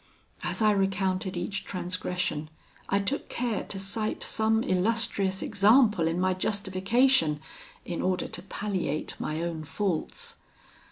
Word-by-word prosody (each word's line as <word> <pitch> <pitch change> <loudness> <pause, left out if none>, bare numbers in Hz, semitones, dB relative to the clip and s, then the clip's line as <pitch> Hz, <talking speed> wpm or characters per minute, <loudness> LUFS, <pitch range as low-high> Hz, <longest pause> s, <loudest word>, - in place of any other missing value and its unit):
As - - -1
I 215 - +6
recounted 190 -2 0
each 190 +3 -2
transgression, 180 -4 -2 0.4
I 200 - +3
took 200 +9 -1
care 235 -3 -1
to 195 - -5
cite 205 +3 -2
some 220 0 +1
illustrious 195 0 +1
example 210 -3 +4
in 165 +2 0
my 185 0 +2
justification, 190 - +2 0.5
in 170 - -3
order 185 0 0
to - - -6
palliate 190 -6 -2
my 155 +2 -2
own 165 -2 -3
faults. 205 - -2
195 Hz, 125 wpm, -28 LUFS, 180-215 Hz, 0.5 s, I